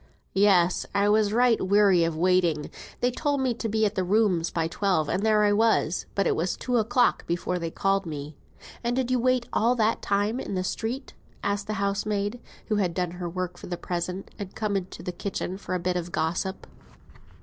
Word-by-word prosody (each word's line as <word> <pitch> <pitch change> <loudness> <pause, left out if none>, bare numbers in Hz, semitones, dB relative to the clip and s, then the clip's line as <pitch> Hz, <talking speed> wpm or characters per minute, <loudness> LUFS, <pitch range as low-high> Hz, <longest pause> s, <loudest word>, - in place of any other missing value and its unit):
"Yes, 190 -3 +3
I 200 0 +3
was 210 -1 +3
right 240 0 +3
weary 195 -2 +4
of 165 -1 -1
waiting; 175 -4 +2 0.3
they 245 - +2
told 285 +2 -1
me 260 -2 +1
to 230 -1 -4
be 220 +1 +2
at 205 - 0
the 190 - 0
rooms 185 -3 +2
by 165 -1 -1
twelve; 170 -2 0
and 185 - 0
there 215 -1 +4
I 205 0 +4
was. 215 -6 +2
But 195 - +1
it - - +2
was 175 +3 -1
two 250 -1 0
o'clock 240 +2 +2
before 175 +1 -1
they 165 -1 -3
called 195 +2 0
me." 150 -1 -6 0.5
"And 240 +1 0
did 255 -1 0
you 255 - +2
wait 255 0 +2
all 235 +3 +3
that 225 -1 +1
time 205 +4 0
in 200 - -4
the 185 - -1
street?" 240 +7 -4 0.3
asked 200 0 -1
the 215 - -2
housemaid, 200 +2 -1 0.3
who 215 - 0
had 180 -5 0
done 180 -2 -1
her 175 0 -5
work 180 0 -4
for - - -9
the 175 - -4
present, 180 +2 -4
and 200 -2 -7
come 210 -2 -1
into 190 -1 -4
the 180 - -3
kitchen 185 0 -4
for 185 - -4
a - - 0
bit 180 +1 -1
of 175 0 -4
gossip. 175 +5 -2
200 Hz, 210 wpm, -26 LUFS, 180-220 Hz, 0.5 s, weary